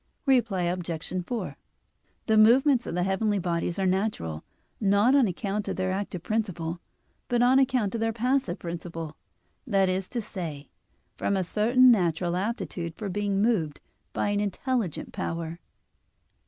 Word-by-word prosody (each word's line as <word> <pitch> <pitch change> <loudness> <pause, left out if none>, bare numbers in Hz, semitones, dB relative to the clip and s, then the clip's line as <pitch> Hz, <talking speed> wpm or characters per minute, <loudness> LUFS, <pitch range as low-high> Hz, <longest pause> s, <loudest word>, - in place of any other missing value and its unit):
Reply 240 -9 +2
Obj. 175 -2 -3
4: 240 -2 -4 0.7
The 220 - +2
movements 245 +4 +5
of - - -3
the 180 - +1
heavenly 205 +2 +1
bodies 170 -1 -1
are 195 - 0
natural, 185 - -1 0.4
not 205 +4 +4
on 275 -5 +5
account 200 +2 -3
of - - -2
their 185 0 -1
active 190 -3 -3
principle, 180 -6 -2 0.5
but 240 0 +2
on 255 +2 +5
account 250 -6 +1
of 230 - -2
their 225 0 +1
passive 240 -4 0
principle; 165 -2 -6 0.5
that 195 -4 +3
is 185 0 -2
to 240 - -3
say, 165 - -6 0.5
from 200 - 0
a 190 - +1
certain 240 +7 +5
natural 175 -4 +1
aptitude 185 -5 -3
for 210 -3 -5
being 200 +1 0
moved 175 -11 +1 0.3
by - - -1
an 205 0 +1
intelligent 210 - -2
power. 165 0 -4
195 Hz, 150 wpm, -27 LUFS, 175-225 Hz, 0.7 s, movements